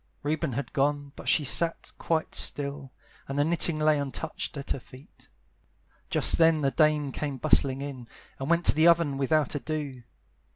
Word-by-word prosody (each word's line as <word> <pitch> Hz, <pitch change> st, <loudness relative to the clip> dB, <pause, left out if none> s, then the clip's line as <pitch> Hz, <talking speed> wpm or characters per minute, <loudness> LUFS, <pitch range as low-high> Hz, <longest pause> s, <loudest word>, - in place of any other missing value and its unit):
Reuben 155 Hz, -1 st, -2 dB
had 135 Hz, 0 st, -5 dB
gone, 145 Hz, 0 st, -1 dB
but -, -, -5 dB
she 155 Hz, -, +3 dB
sat 165 Hz, +4 st, +1 dB
quite 160 Hz, -1 st, -2 dB
still, 140 Hz, -2 st, -1 dB, 0.4 s
And 135 Hz, -, -5 dB
the 145 Hz, -, +3 dB
knitting 165 Hz, 0 st, +2 dB
lay 155 Hz, -1 st, +2 dB
untouched 140 Hz, +1 st, -5 dB
at 140 Hz, -, -7 dB
her -, -, -1 dB
feet. 130 Hz, +3 st, -18 dB, 0.8 s
Just -, -, +4 dB
then 165 Hz, -1 st, +4 dB
the 135 Hz, -1 st, +1 dB
dame 150 Hz, -2 st, +1 dB
came 140 Hz, 0 st, -4 dB
bustling 135 Hz, +2 st, +2 dB
in, 135 Hz, -4 st, -7 dB, 0.3 s
And 135 Hz, +2 st, -5 dB
went 170 Hz, 0 st, +1 dB
to -, -, +5 dB
the 155 Hz, +2 st, +3 dB
oven 165 Hz, -5 st, +2 dB
without 145 Hz, 0 st, +1 dB
ado. 145 Hz, -3 st, -5 dB
145 Hz, 170 wpm, -27 LUFS, 135-155 Hz, 0.8 s, to